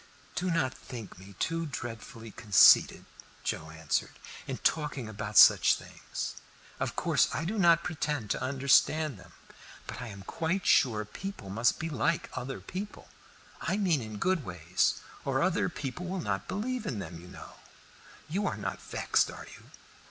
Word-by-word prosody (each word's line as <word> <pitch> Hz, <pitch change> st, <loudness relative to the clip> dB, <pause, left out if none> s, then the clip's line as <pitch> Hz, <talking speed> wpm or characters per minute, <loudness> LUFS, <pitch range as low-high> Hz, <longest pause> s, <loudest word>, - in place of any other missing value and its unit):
"Do 185 Hz, +1 st, -1 dB
not 165 Hz, -6 st, +1 dB
think 115 Hz, -7 st, -9 dB
me 95 Hz, +1 st, -13 dB
too 165 Hz, 0 st, -1 dB
dreadfully 115 Hz, -3 st, -7 dB
conceited," 105 Hz, -2 st, +6 dB, 0.4 s
Joe 80 Hz, -, -3 dB
answered, 80 Hz, -1 st, -2 dB, 0.3 s
"in -, -, -3 dB
talking 150 Hz, -6 st, 0 dB
about 105 Hz, 0 st, -4 dB
such -, -, +8 dB
things. -, -, -6 dB, 0.5 s
Of -, -, -2 dB
course -, -, +3 dB
I 160 Hz, -, -2 dB
do 210 Hz, +4 st, -2 dB
not 170 Hz, -2 st, +5 dB
pretend 150 Hz, -, -2 dB
to -, -, -1 dB
understand 140 Hz, 0 st, +3 dB
them, 85 Hz, -1 st, -16 dB, 0.5 s
but -, -, -7 dB
I 125 Hz, -, -5 dB
am 100 Hz, -3 st, -9 dB
quite 165 Hz, -, -2 dB
sure 110 Hz, -4 st, +4 dB
people 145 Hz, -, -7 dB
must 115 Hz, +4 st, +2 dB
be 160 Hz, -, -2 dB
like 155 Hz, +2 st, 0 dB
other 135 Hz, +2 st, -5 dB
people 200 Hz, +3 st, -7 dB, 0.5 s
I 195 Hz, -, 0 dB
mean 180 Hz, -9 st, +2 dB
in 110 Hz, -2 st, -7 dB
good 185 Hz, -, +1 dB
ways 90 Hz, -2 st, 0 dB, 0.3 s
or 135 Hz, +1 st, +1 dB
other 185 Hz, +2 st, +1 dB
people 165 Hz, +3 st, -5 dB
will 190 Hz, +1 st, -3 dB
not 100 Hz, -, -2 dB
believe 235 Hz, +3 st, -3 dB
in 120 Hz, -, -2 dB
them, 85 Hz, -4 st, -6 dB
you 90 Hz, -, -12 dB
know. 90 Hz, -, -12 dB, 0.7 s
You 195 Hz, +6 st, -1 dB
are -, -, -2 dB
not -, -, -4 dB
vexed, -, -, +1 dB
are -, -, -9 dB
you?" -, -, -17 dB
135 Hz, 165 wpm, -30 LUFS, 105-170 Hz, 0.7 s, such